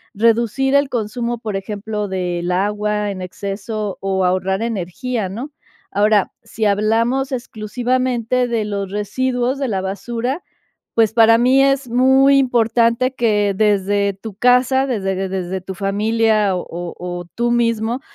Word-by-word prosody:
reducir 230 Hz, +5 st, +2 dB
el 280 Hz, -1 st, +3 dB
consumo, 235 Hz, 0 st, -2 dB
por 215 Hz, -3 st, -4 dB
ejemplo, 210 Hz, +1 st, -4 dB
del 180 Hz, -2 st, -2 dB
agua 210 Hz, +2 st, 0 dB
en 185 Hz, -2 st, -6 dB
exceso, 200 Hz, +2 st, -5 dB
o 190 Hz, -1 st, 0 dB
ahorrar 185 Hz, +2 st, 0 dB
energía, 225 Hz, +1 st, -3 dB
¿no?, 240 Hz, +10 st, -6 dB, 0.4 s
ahora, 210 Hz, -1 st, +2 dB
si 220 Hz, -, -3 dB
hablamos 225 Hz, +6 st, +1 dB
exclusivamente 245 Hz, +1 st, -1 dB
de 230 Hz, -3 st, -1 dB
los 200 Hz, -2 st, -4 dB
residuos 250 Hz, +5 st, -1 dB
de 275 Hz, -1 st, -2 dB
la 195 Hz, -2 st, -1 dB
basura, 235 Hz, -, -3 dB, 0.5 s
pues, 220 Hz, -1 st, +3 dB
para 230 Hz, 0 st, +6 dB
mí 255 Hz, +3 st, +4 dB
es 275 Hz, -1 st, +1 dB
muy 265 Hz, +3 st, +5 dB
importante 240 Hz, 0 st, +2 dB
que 210 Hz, -4 st, +1 dB
desde 200 Hz, -1 st, +1 dB
tu 195 Hz, +2 st, -9 dB
casa, 250 Hz, +3 st, +3 dB
desde 195 Hz, -7 st, -1 dB
de 190 Hz, 0 st, -3 dB
desde 185 Hz, 0 st, -3 dB
tu 190 Hz, +1 st, -7 dB
familia 210 Hz, +1 st, +1 dB
o 180 Hz, -, -4 dB, 0.3 s
o 175 Hz, 0 st, -5 dB
tú 240 Hz, 0 st, 0 dB
mismo, 230 Hz, +1 st, 0 dB
220 Hz, 140 wpm, -19 LUFS, 195-245 Hz, 0.5 s, para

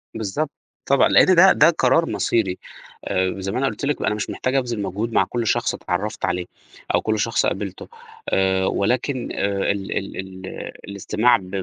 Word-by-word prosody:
بالضبط، 110 Hz, +8 st, -2 dB, 0.4 s
طبعًا، 140 Hz, -, +4 dB
لأن 185 Hz, -, +6 dB
ده، 190 Hz, +3 st, +8 dB
ده 155 Hz, +3 st, +6 dB
قرار 160 Hz, +1 st, +2 dB
مصيري، 95 Hz, -6 st, 0 dB, 0.5 s
آآ، 95 Hz, 0 st, 0 dB
زي 95 Hz, 0 st, -3 dB
ما -, -, -3 dB
أنا 135 Hz, -, +1 dB
قُلت 140 Hz, -, -4 dB
لِك 145 Hz, -, -1 dB
أنا 105 Hz, -, 0 dB
مش 105 Hz, -, -4 dB
محتاج 130 Hz, +1 st, -2 dB
أبذل 120 Hz, -5 st, -1 dB
مجهود 105 Hz, +4 st, -3 dB
مع -, -, +4 dB
كُلّ 120 Hz, -2 st, -3 dB
شخص -, -, +1 dB
اتعرّفت 100 Hz, +4 st, -3 dB
عليه، 90 Hz, 0 st, -2 dB, 0.5 s
أو -, -, +2 dB
كُلّ 110 Hz, -1 st, -1 dB
شخص -, -, +1 dB
قابلته، -, -, -3 dB, 0.4 s
آآ، 95 Hz, 0 st, +2 dB
ولكن 125 Hz, +6 st, -1 dB
آآ، 100 Hz, 0 st, 0 dB
ال 100 Hz, -1 st, -4 dB
ال 100 Hz, -, -5 dB
ال 95 Hz, 0 st, -7 dB
آآ، -, -, -7 dB, 0.2 s
الاستماع 105 Hz, +4 st, +2 dB
ب 90 Hz, -1 st, -12 dB
105 Hz, 185 wpm, -22 LUFS, 95-130 Hz, 0.5 s, ده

